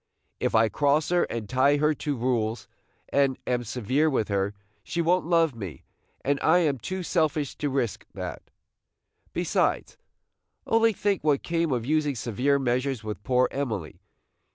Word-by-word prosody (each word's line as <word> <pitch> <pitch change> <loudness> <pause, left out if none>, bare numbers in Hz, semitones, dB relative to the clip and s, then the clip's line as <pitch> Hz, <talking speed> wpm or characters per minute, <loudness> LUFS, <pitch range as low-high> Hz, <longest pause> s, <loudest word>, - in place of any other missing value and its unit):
If - - 0
I 110 0 +5
cross 145 +7 +1
her 175 0 +3
and 115 -3 -5
tie 130 +5 +3
her 150 +1 +3
to 145 -1 -3
rules, 115 -3 -1 0.4
and 140 -2 +2
am 125 -1 0
severe 125 +6 0
with 120 -7 0
her, 100 0 0 0.3
she 170 - -4
won't 170 0 +2
love 165 -4 +3
me, 100 -9 -8 0.4
and 140 +1 +1
I 160 +3 +5
am 150 -7 +1
too 185 +9 -4
selfish 155 -5 0
to 145 - -1
risk 130 -5 -2
that. - - -5 0.9
Besides, - - 0 0.7
only 225 0 +4
think 205 -3 -1
what 145 -3 +2
came 165 -2 0
of 120 -3 -1
using 150 0 +1
severe 125 +5 +1
measures 130 -1 -1
with 105 -3 -5
poor 125 +3 +2
Emily! 110 - -4
140 Hz, 155 wpm, -26 LUFS, 120-155 Hz, 0.9 s, I